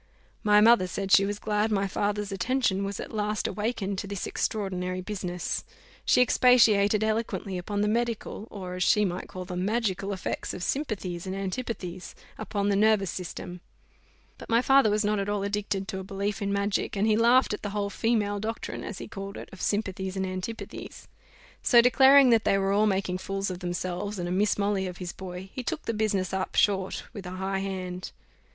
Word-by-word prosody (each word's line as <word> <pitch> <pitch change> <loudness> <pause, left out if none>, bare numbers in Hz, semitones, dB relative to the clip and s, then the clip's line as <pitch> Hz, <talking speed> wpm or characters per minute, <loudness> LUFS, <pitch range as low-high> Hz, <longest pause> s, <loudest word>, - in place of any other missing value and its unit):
My 210 0 +6
mother 225 -4 +6
said 195 +1 -4
she 195 - +7
was 205 0 -2
glad 210 +1 0
my 200 -1 +1
father's 205 +1 -1
attention 200 0 0
was 200 0 -4
at - - -7
last 210 0 -1
awakened 210 -3 -2
to 200 - -5
this 200 -2 -4
extraordinary 185 -3 -2
business. 180 -2 -3 0.4
She - - +5
expatiated 220 -5 +5
eloquently 215 -3 -1
upon 205 +3 -2
the 210 - +2
medical, 230 -1 -2
or, 185 -3 -7
as 180 - -5
she 210 +3 +4
might 180 -1 -3
call 185 0 -7
them, 180 0 -3
magical 200 -2 -1
effects 190 -2 -3
of 180 - -6
sympathies 190 - -3
and 190 - -3
antipathies: 190 -2 -5 0.4
on 205 -1 +1
the 200 - +2
nervous 205 -3 +3
system; 180 0 -6 0.8
but - - -11
my 230 0 +4
father 270 -2 +5
was 210 +1 +1
not 210 0 +1
at 200 +1 -2
all 205 -1 -1
addicted 200 -1 -2
to 190 - -3
a - - -6
belief 200 +2 -3
in 200 0 -1
magic, 200 +1 0
and 200 - +2
he 215 -1 +4
laughed 235 +2 +4
at 210 - -4
the 205 - -3
whole 200 0 -2
female 210 -3 0
doctrine, 225 +2 -4
as 210 - -6
he - - -7
called 195 -1 -7
it, - - -9
of 190 - -10
sympathies 190 -2 -2
and 190 - 0
antipathies: 185 +4 -6 0.5
so, 240 - +6
declaring 265 +2 +7
that 225 -2 +4
they 195 - +3
were 195 0 +1
all 210 +2 +3
making 190 -2 0
fools 195 0 -3
of 180 - -6
themselves, 180 +3 -3
and 175 -1 -3
a - - -3
Miss 205 +3 +2
Molly 200 -2 0
of 180 -1 -7
his 180 -1 -5
boy, 185 0 -8
he 255 - -4
took 310 +5 -4
the 230 - -2
business 205 -4 0
up 190 0 -2
short 195 -2 +1
with 200 -5 -7
a 180 - -6
high 190 +1 -1
hand. 185 -2 -4
200 Hz, 200 wpm, -27 LUFS, 190-215 Hz, 0.8 s, she